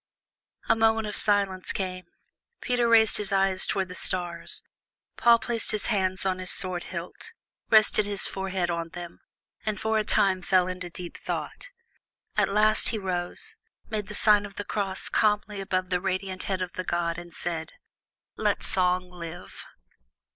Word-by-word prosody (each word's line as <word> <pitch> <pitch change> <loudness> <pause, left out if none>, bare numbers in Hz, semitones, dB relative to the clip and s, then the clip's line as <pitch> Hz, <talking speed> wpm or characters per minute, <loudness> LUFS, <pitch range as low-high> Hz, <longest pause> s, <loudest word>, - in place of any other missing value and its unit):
A 225 - +4
moment 225 0 +2
of 210 -1 -5
silence 200 -3 +2
came. 185 -2 -4 0.5
Peter 245 -2 +1
raised 225 -2 +5
his 205 -2 -2
eyes 195 -1 +2
toward 190 -2 -1
the 180 - -8
stars. 175 -2 +1 0.5
Paul 235 -1 +5
placed 230 -1 -2
his 215 - +1
hands 190 -1 +1
on 185 -1 0
his 185 -1 -4
sword 180 -2 +2
hilt, 180 - -7 0.4
rested 215 -1 +5
his 200 -1 -1
forehead 190 -2 -2
on 170 -1 -3
them, 175 -1 -8 0.4
and 215 0 -2
for 220 0 +1
a - - 0
time 190 -2 +2
fell 185 0 +3
into 185 -1 -5
deep 175 0 -8
thought. - - -5 0.7
At - - +2
last 215 +2 +4
he 225 - -2
rose, 190 - -3 0.3
made 210 -2 -3
the 210 - -7
sign 210 -1 +5
of 205 -1 -9
the 205 - -5
cross 195 -3 -3
calmly 210 -1 +1
above 185 -1 -2
the 180 -1 +1
radiant 190 0 -3
head 185 -1 0
of 180 - -7
the 185 - -4
god, 170 -1 -1
and 175 0 -11
said: 165 -1 -4 0.6
"Let - - 0
Song 180 -1 0
live!" 175 0 -9
190 Hz, 165 wpm, -26 LUFS, 180-210 Hz, 0.7 s, raised